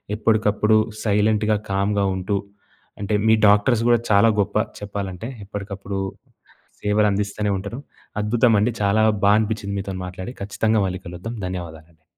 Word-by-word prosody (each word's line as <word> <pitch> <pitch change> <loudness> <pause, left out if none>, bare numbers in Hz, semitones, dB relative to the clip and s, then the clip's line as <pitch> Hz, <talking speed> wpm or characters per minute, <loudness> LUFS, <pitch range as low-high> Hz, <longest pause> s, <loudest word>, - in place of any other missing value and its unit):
ఎప్పడకప్పుడు 110 0 +2 0.3
సైలెంట్‌గా, 105 0 +2 0.2
కామ్‌గా 100 +1 +1
ఉంటూ, 95 +2 -1 0.6
అంటే 105 +1 -1
మీ 110 - +6
డాక్టర్స్ 110 +3 +4
గూడా 120 -1 +5
చాలా 100 +3 +6
గొప్ప 100 +1 0 0.2
చెప్పాలంటే 100 -1 -5 0.2
ఎప్పడకప్పుడు 100 -1 -5 0.8
సేవలందిస్తనే 105 0 +1
ఉంటారు. 100 +7 -6 0.4
అద్భుతమండి. 115 0 +3
చాలా 100 +2 +3 0.2
బా 100 - +6
అనిపించింది 105 -2 -2
మీతో 95 0 -5
మాట్లాడి. 95 +6 -7
ఖచ్చితంగా 110 +1 +1
మళ్ళీ 95 +1 -5
కలుద్దాం. 90 +7 -6
ధన్యవాదాలండి. 80 -3 -8
105 Hz, 120 wpm, -22 LUFS, 100-110 Hz, 0.8 s, మీ